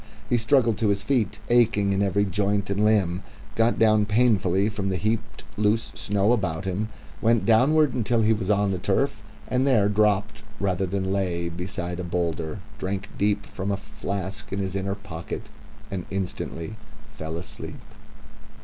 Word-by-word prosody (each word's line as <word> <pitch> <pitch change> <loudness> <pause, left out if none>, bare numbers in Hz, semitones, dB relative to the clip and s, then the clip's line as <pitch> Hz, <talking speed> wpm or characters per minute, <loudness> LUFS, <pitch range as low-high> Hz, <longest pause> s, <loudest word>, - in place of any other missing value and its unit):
He 120 - +4
struggled 115 -2 +3
to 115 - +2
his 100 -1 +1
feet, 110 -4 0
aching 110 -4 +4
in 95 - +1
every 100 +1 +2
joint 100 +1 0
and 100 +1 +1
limb, 100 -5 +2 0.3
got 115 +1 +3
down 110 -2 +4
painfully 105 -4 +3
from 100 -2 -2
the 95 - 0
heaped 110 +2 -2
loose 105 +2 +1
snow 100 +1 +1
about 95 -7 0
him, 100 +4 -2 0.3
went 115 -2 +3
downward 135 +6 +4
until 115 -1 +1
he 110 +1 +4
was 105 -3 -3
on 100 -1 +3
the 95 - -2
turf, - - 0 0.3
and 130 +2 +1
there 110 -7 +4
dropped 105 0 +1 0.2
rather 95 -1 0
than 95 +1 -1
lay 85 -3 -1
beside 90 0 -4
a - - -2
boulder, 85 0 -2 0.2
drank 95 +1 -3
deep 105 0 +1
from 95 +1 -5
the 100 - 0
flask 100 -2 -5
in 100 - -2
his 95 -2 -2
inner 100 0 -1
pocket, 90 -5 -6 0.5
and 95 -3 -4
instantly 95 0 -4 0.4
fell 80 -2 -5
asleep... 85 - -7
100 Hz, 165 wpm, -25 LUFS, 95-110 Hz, 0.5 s, He